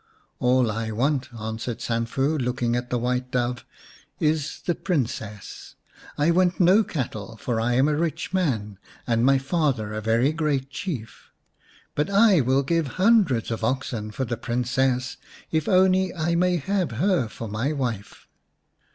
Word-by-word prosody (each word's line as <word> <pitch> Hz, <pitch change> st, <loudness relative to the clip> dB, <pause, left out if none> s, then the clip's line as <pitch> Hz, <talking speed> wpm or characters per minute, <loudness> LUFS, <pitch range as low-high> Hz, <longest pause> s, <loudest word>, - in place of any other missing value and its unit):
" -, -, -43 dB
All 125 Hz, -3 st, +3 dB
I 110 Hz, +1 st, -3 dB
want," 130 Hz, +5 st, 0 dB
answered 115 Hz, +1 st, -5 dB
Sanfu, 120 Hz, +5 st, -1 dB
looking 125 Hz, -1 st, 0 dB
at 120 Hz, 0 st, -3 dB
the 125 Hz, -, 0 dB
White 125 Hz, +1 st, -1 dB
Dove, 125 Hz, -1 st, -1 dB, 0.3 s
" -, -, -29 dB
is 155 Hz, -2 st, -5 dB
the 175 Hz, -, +2 dB
Princess. 115 Hz, -, -4 dB, 0.4 s
I 150 Hz, +3 st, +3 dB
want 180 Hz, +1 st, +2 dB
no 190 Hz, +5 st, +5 dB
cattle, 115 Hz, -, -5 dB
for 115 Hz, 0 st, -2 dB
I 120 Hz, +2 st, +1 dB
am 130 Hz, +4 st, +3 dB
a 150 Hz, -, +1 dB
rich 165 Hz, +3 st, -2 dB
man, 110 Hz, -, -1 dB, 0.3 s
and 115 Hz, -1 st, +1 dB
my 135 Hz, +1 st, +5 dB
father 135 Hz, -, -1 dB
a 110 Hz, -, -3 dB
very 115 Hz, +6 st, +2 dB
great 145 Hz, -4 st, -1 dB
Chief. 140 Hz, -, -6 dB, 0.6 s
But 150 Hz, +6 st, -1 dB
I 200 Hz, -4 st, +5 dB
will 130 Hz, +2 st, +2 dB
give 165 Hz, +2 st, 0 dB
hundreds 185 Hz, -, +3 dB
of 115 Hz, 0 st, -3 dB
oxen 115 Hz, -3 st, -2 dB
for 130 Hz, +5 st, -3 dB
the 120 Hz, -1 st, -3 dB
Princess 125 Hz, +1 st, -1 dB, 0.3 s
if 155 Hz, -2 st, 0 dB
only 185 Hz, 0 st, +4 dB
I 170 Hz, 0 st, 0 dB
may 180 Hz, +1 st, +2 dB
have 185 Hz, -2 st, -1 dB
her 170 Hz, -, +1 dB
for 115 Hz, +1 st, -7 dB
my 110 Hz, +7 st, -1 dB
wife." 120 Hz, -9 st, -4 dB
130 Hz, 160 wpm, -24 LUFS, 115-165 Hz, 0.6 s, no